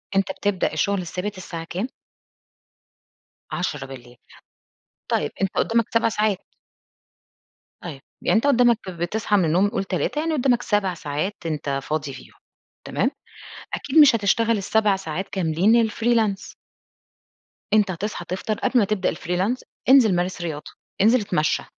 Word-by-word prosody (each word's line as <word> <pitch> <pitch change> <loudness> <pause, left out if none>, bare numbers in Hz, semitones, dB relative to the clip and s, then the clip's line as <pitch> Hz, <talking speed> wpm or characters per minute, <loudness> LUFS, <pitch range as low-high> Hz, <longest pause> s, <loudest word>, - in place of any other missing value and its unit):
أنت 195 0 +2
بتبدأ 205 -3 -1
الشغل 200 -1 0
الثابت 185 +3 -5
الساعة 170 -3 -6
كام؟ 185 +8 -4 1.6
22:00. 135 -7 -5 0.9
طيب، - - 0
أنت 195 - +2
قُدّامك 230 0 +2
7 230 0 +3
ساعات. 210 -3 0 1.4
طيب، 150 -6 -8 0.2
يعني - - +2
أنت 230 - +1
قُدّامك 240 -4 +4
بتصحى 185 +5 -1
من 185 - +3
النوم 180 +6 +3
قُل 210 -3 -2
15:00، 190 +10 -2
يعني 320 +1 -1
قُدّامك 250 -4 +2
7 205 -5 0
ساعات 155 +4 -3
أنت 150 -3 -3
فاضي 150 -2 -3
فيهم، - - -13 0.5
تمام؟ - - 0 0.6
أكيد 290 +3 -2
مش 290 -5 +8
هتشتغل 230 +2 +2
ال7 205 +1 +2
ساعات 190 0 -5
كاملين 195 +5 +2
الfreelance. 220 -3 0 1.2
أنت 210 -2 +4
هتصحى 185 0 -4
تفطر 190 +4 -3
قبل 255 -1 +2
ما 210 - +3
تبدأ 195 -2 0
الfreelance، 185 +10 -1 0.3
انزل 250 -8 +6
مارس 180 +1 -2
رياضة، 155 -3 -5 0.3
انزل 225 +4 +5
اتمشّى، 155 -6 0
195 Hz, 130 wpm, -23 LUFS, 175-225 Hz, 1.6 s, مش